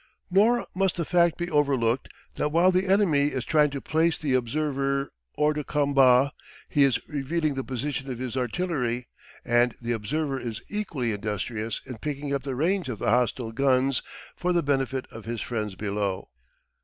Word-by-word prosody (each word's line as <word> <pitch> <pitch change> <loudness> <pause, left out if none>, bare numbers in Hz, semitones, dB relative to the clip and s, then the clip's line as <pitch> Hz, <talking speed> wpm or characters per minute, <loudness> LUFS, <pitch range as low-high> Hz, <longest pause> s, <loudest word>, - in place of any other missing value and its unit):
Nor 225 +6 +4
must 190 0 +1
the 170 - -2
fact 170 -1 +3
be 175 0 -3
overlooked 135 -5 +1 0.2
that 150 - -1
while 175 +4 +5
the 185 +1 +1
enemy 180 -8 +4
is 130 -4 -3
trying 150 -2 +4
to 140 0 -4
place 160 +3 +1
the 145 -4 -1
observer 140 +2 0 0.2
hors 150 0 +3
de 150 0 -3
combat, 140 -2 +4 0.4
he 145 - +1
is 135 -3 +1
revealing 150 +1 -1
the 135 -1 -3
position 135 +2 -3
of 125 - -4
his 125 0 -4
artillery, 125 -3 -1 0.4
and 120 0 +3
the 120 0 -3
observer 135 +5 -1
is 115 -2 -5
equally 165 - -2
industrious 105 +1 -3
in 125 -4 -8
picking 145 0 -3
up 140 - 0
the 135 -1 -4
range 170 +2 0
of 115 - -3
the 100 - 0
hostile 120 -1 +1
guns 135 +1 +2 0.3
for 180 - -1
the 170 -1 +2
benefit 135 -2 0
of 115 -1 -10
his 115 0 -3
friends 105 -5 -3
below. 100 -1 -3
135 Hz, 175 wpm, -26 LUFS, 120-155 Hz, 0.4 s, while